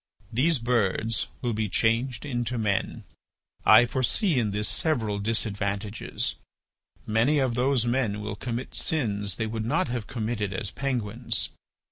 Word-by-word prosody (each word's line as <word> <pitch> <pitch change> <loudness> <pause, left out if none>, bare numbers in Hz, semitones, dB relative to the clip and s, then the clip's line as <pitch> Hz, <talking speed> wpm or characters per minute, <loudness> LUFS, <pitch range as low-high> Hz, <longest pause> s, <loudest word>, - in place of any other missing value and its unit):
These 150 +7 +3
birds 115 -2 0 0.2
will 120 -2 0
be 110 -1 -1
changed 115 +4 +1
into 120 -3 -1
men. 105 -3 -1 0.6
I 110 +3 +8
foresee 130 - +1
in 110 -3 +1
this 105 +1 0
several 110 -10 0
disadvantages. 100 -1 -1 0.7
Many 115 +8 +3
of 130 -4 +2
those 125 0 +2
men 120 -4 0
will 105 0 -4
commit 120 +4 -4
sins 105 - -1
they 110 - -1
would 110 0 -3
not 115 - +1
have 120 -3 -3
committed 110 -4 -2
as 95 +1 -3
penguins. 120 -3 -1
115 Hz, 135 wpm, -27 LUFS, 105-125 Hz, 0.7 s, I